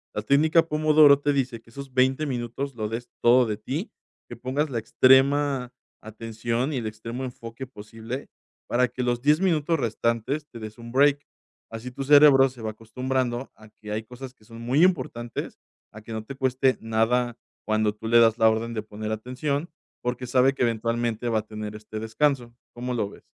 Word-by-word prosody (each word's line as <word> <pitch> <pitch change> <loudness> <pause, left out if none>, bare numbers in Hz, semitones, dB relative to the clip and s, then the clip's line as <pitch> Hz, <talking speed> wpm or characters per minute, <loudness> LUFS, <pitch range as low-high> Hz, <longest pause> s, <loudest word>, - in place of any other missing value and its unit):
la 105 - -1
técnica 160 +5 +3
Pomodoro 155 -2 +5
te 145 0 +1
dice 125 -4 -2
que 115 - -22
esos 140 0 -9
20 130 +3 +2
minutos, 130 +1 -4
lo 110 -2 -3
des 115 +2 -5 0.2
todo 125 +1 +6
de 105 -2 -2
ti, 140 - -4 0.4
que - - -7
pongas 135 +5 -1
la 120 - -2
extrema 135 +2 +3 0.3
atención 115 +5 -3
y - - -1
el 115 -3 -3
extremo 115 +4 -6
enfoque 120 0 -7
posible 115 +2 -8 0.4
para 125 +1 +2
que 125 +1 -4
los 120 -1 0
10 150 +3 +4
minutos 165 -3 +1
restantes 115 +5 -1
te 115 - -10
des 110 0 -8
un 115 0 -10
break, 145 +2 +3 0.5
así 115 +3 -6
tu 135 +2 -5
cerebro 140 -1 +7
se 125 -2 -13
va 110 -1 -3
acostumbrando 125 +3 -3
a 110 0 -17
que 105 - -8
hay 110 - -3
cosas 125 +3 -10
que 110 - -27
son 115 +1 -12
muy 130 +8 +2
importantes, 130 -9 -1 0.4
a 110 - -10
que 115 +1 -9
no 110 0 -4
te 135 - -8
cueste 130 0 +1
nada 115 +2 0 0.3
cuando 110 -1 +1
tú 110 +1 -8
le 120 +1 +6
das 115 0 +5
la 110 -1 +5
orden 115 +1 -2
de 110 - -2
poner 110 0 -6
atención, 135 +8 -3 0.3
porque 125 +1 -3
sabe 130 +2 +3
que 135 - -1
eventualmente 115 0 -1
va 110 -1 +2
a 110 - -9
tener 105 -1 -6
este 110 0 -7
descanso, 120 +1 0 0.2
¿cómo 125 +1 -4
lo 105 -4 -1
ves? - - -15
120 Hz, 195 wpm, -25 LUFS, 115-135 Hz, 0.5 s, cerebro